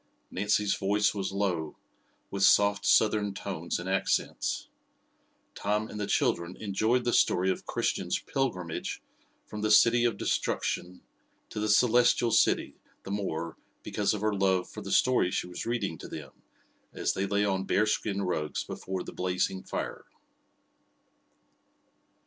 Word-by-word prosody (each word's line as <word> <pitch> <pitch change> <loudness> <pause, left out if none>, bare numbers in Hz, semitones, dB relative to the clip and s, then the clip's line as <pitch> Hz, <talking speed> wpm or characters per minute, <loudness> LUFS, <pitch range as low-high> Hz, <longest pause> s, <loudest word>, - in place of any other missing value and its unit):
Nancy's 105 +1 +1
voice 105 +1 +1
was 100 -2 -3
low, 90 -6 -2 0.5
with 100 - -3
soft, 100 +1 +4
southern 105 -2 +3
tones 85 -4 -3
and 85 - -6
accents. 95 +1 -1 0.9
Tom 105 +1 -1
and 105 - -6
the 105 - -2
children 85 +2 0
enjoyed 110 +4 0
the 120 -1 0
story 95 +1 +3
of - - -5
Christian's - - -1
pilgrimage 90 -12 -3 0.5
from 105 - -7
the 110 - 0
City 115 +3 +6
of 115 -4 +1
Destruction 90 -2 -2 0.5
to - - -4
the 105 0 -1
Celestial 120 +1 +4
City 110 - +3 0.3
the 95 - -7
more 85 -5 -3 0.3
because 105 0 0
of 105 - -5
her 110 0 +1
love 95 -2 +1
for - - -9
the - - -6
story 130 -8 +3
she - - -2
was 90 +5 -6
reading 100 -9 -2
to - - -8
them, 70 -4 -8 0.6
as - - -1
they 95 +1 -1
lay 100 +1 +1
on 95 -1 0
bearskin 105 -1 +1
rugs 75 -5 -2
before 95 -1 -5
the - - -9
blazing 90 +1 -1
fire. - - -5
100 Hz, 145 wpm, -29 LUFS, 90-105 Hz, 0.9 s, City